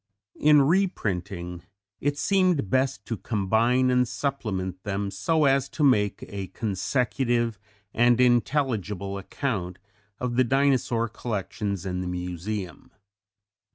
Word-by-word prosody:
In 150 -1 +6
reprinting 95 - -1 0.4
it 145 +1 -1
seemed 180 - +2
best 130 -6 +1
to 115 - -3
combine 115 +6 +2
and 125 0 +3
supplement 95 -10 -3
them 100 0 -3
so 150 +11 +1
as 135 -1 +2
to 155 - -2
make 105 -8 +3
a 100 -2 -5
consecutive 115 +3 -1 0.3
and 120 +1 +4
intelligible 115 - +1
account 95 -4 -3 0.4
of 125 -1 -2
the 130 - +6
Dinosaur 130 -3 +2
collections 105 -3 -4
in 90 -1 -2
the 90 - -4
Museum. 90 +1 -5
115 Hz, 115 wpm, -26 LUFS, 95-130 Hz, 0.4 s, In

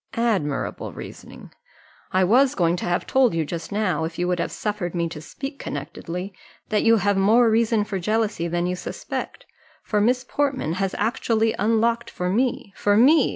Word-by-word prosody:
"Admirable 205 -12 -1
reasoning! - - -11 0.6
I 185 0 +3
was 255 +8 +4
going 170 -2 +2
to - - -4
have 175 0 0
told 260 -8 +3
you 160 -1 0
just 165 +4 -6
now, 205 -5 0
if 160 0 -4
you 175 - 0
would 180 -1 0
have - - -1
suffered 205 -5 -3
me 170 -1 0
to 155 -2 -8
speak 275 - -7
connectedly, 175 +6 -5 0.4
that 215 - +2
you 230 0 +5
have 205 -1 +1
more 225 +4 +5
reason 225 -1 +2
for 205 -2 -4
jealousy 215 -2 0
than 175 +1 -1
you 180 0 -1
suspect, - - -6 0.4
for 210 -1 0
Miss 250 +4 +2
Portman 275 - -1
has 195 -1 -1
actually 225 0 +1
unlocked 230 +3 +1
for 180 0 -3
me 235 -2 0
for 205 0 +2
me! 280 +5 +5
205 Hz, 180 wpm, -23 LUFS, 175-230 Hz, 0.6 s, you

